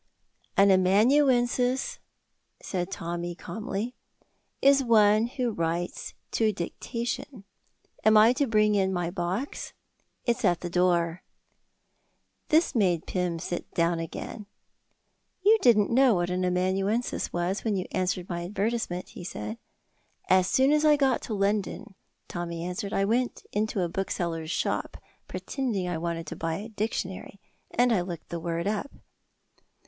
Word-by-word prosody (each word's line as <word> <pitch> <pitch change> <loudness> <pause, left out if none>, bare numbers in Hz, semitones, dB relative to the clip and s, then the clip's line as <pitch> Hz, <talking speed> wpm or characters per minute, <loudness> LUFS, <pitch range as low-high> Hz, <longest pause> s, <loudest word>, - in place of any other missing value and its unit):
"An 200 0 +6
amanuensis," 245 +6 +3 0.6
said 180 -1 -3
Tommy, 175 -1 -4
calmly, 215 +4 -4 0.7
"is 275 0 +5
one 215 -1 +5
who 250 -1 -2
writes 170 -2 -3 0.2
to 220 -1 +2
dictation. 230 +5 -5 0.6
Am 215 0 +6
I 220 +3 +7
to 280 +2 0
bring 215 -2 +3
in 190 -2 +2
my 175 -2 -1
box? 185 +8 -3 0.5
It's 240 0 0
at 175 -4 +2
the 175 - -5
door." 175 -1 +2 1.3
This 315 0 +3
made 185 - +2
Pym 180 -2 -1
sit 175 +1 -5
down 170 0 +2
again. 200 +5 -6 1.0
"You 435 +2 +6
didn't 215 -4 +4
know 255 -2 +5
what 175 0 0
an 185 0 -1
amanuensis 190 +6 0
was 175 +3 -1
when 220 -3 0
you 185 -1 -2
answered 180 -1 -1
my 170 -1 -3
advertisement," 205 -1 -2
he - - -10
said. 220 +5 -6 0.7
"As 185 0 +4
soon 265 +2 +4
as 300 0 +3
I 305 -1 +6
got 270 -4 +2
to 220 - -4
London," 200 +1 -1 0.3
Tommy 170 -1 -4
answered, 180 +3 -4
"I 195 - +1
went 240 +4 -1
into 210 -1 -1
a - - 0
bookseller's 170 -3 -3
shop, - - -2 0.3
pretending 230 -10 -3
I 175 -2 -2
wanted 165 0 -3
to - - -6
buy 165 0 -2
a 210 +6 -6
dictionary, 200 -3 -4 0.3
and 245 0 +3
I 190 - +2
looked 175 -2 -7
the 170 - -4
word 170 +1 -2
up." 215 +7 -1
195 Hz, 140 wpm, -27 LUFS, 175-235 Hz, 1.3 s, I